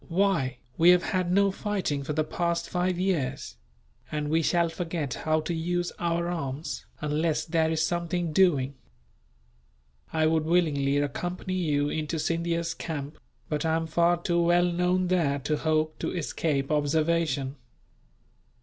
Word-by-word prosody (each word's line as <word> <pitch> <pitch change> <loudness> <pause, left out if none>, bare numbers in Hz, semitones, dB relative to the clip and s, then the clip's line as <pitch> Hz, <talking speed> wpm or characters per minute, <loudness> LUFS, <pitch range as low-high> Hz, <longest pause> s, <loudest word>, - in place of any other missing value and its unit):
"Why, 165 -8 +1 0.2
we 170 +2 +7
have 180 0 +6
had 185 -2 0
no 200 +1 +4
fighting 190 -8 -2
for 150 - -3
the 155 +1 +1
past 170 +2 -1
five 180 0 0
years; 180 -8 -1 0.5
and 150 -1 -2
we 165 +1 +3
shall 170 +1 +2
forget 165 -5 -3
how 155 0 0
to 165 +3 -3
use 175 +2 -1
our 170 0 0
arms, 150 -4 -4
unless 150 +1 0
there 160 -1 +1
is 160 0 +1
something 170 -1 -1
doing. 145 -8 +3 1.4
I 160 -1 +2
would 160 0 +2
willingly 150 -5 +2
accompany 175 +6 -2
you 150 -5 +1
into 155 +1 -2
Scindia's 165 +1 -1
camp, 150 -3 -6 0.3
but 150 -1 -2
I 160 -1 +2
am 165 0 -1
far 170 +2 +2
too 170 0 +1
well 175 +1 +4
known 180 +1 +1
there 165 -6 +2
to 150 +2 -1
hope 155 0 0
to - - -2
escape 145 -3 -1
observation. 150 -2 +1
165 Hz, 150 wpm, -27 LUFS, 150-175 Hz, 1.4 s, we